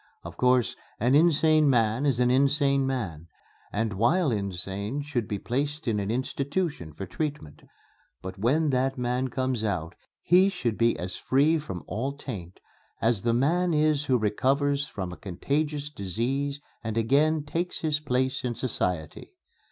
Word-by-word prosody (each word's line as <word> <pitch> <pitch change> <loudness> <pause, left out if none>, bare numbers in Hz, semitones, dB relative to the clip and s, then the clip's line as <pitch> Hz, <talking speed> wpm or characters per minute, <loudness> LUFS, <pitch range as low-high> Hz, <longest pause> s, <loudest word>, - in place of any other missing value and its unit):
Of - - -8
course, 125 -3 +2 0.2
an 125 +4 +2
insane 155 -1 +5
man 115 +2 +2
is 130 -4 +1
an 125 0 +3
insane 140 0 +3
man 90 - -3 0.4
and 110 0 -1
while 140 - +2
insane 100 +5 -3
should 125 -7 -2
be 105 - -2
placed 145 +7 -3
in 110 -3 +1
an 100 0 -3
institution 135 - -2
for 95 +6 -7
treatment, 145 - -5 0.6
but 95 +1 -8
when 145 +8 +2
that 135 +1 0
man 125 +1 0
comes 130 -2 -1
out 90 -6 -2 0.3
he 185 +3 +5
should 120 - -2
be 115 +1 +2
as 90 +1 -5
free 150 +5 +3
from 95 - -6
all 130 +7 -3
taint 100 -11 -8 0.4
as 115 -2 +1
the 115 +1 +1
man 170 +6 +2
is 150 -1 +2
who 130 -3 +3
recovers 140 +6 +1
from 95 -3 -5
a - - -10
contagious 145 - -2
disease 135 +5 -2 0.2
and 110 0 -3
again 145 +7 +3
takes 170 +4 -3
his 155 -2 +1
place 130 -2 -1
in 120 -2 -2
society." 90 - -3
130 Hz, 155 wpm, -27 LUFS, 110-145 Hz, 0.6 s, insane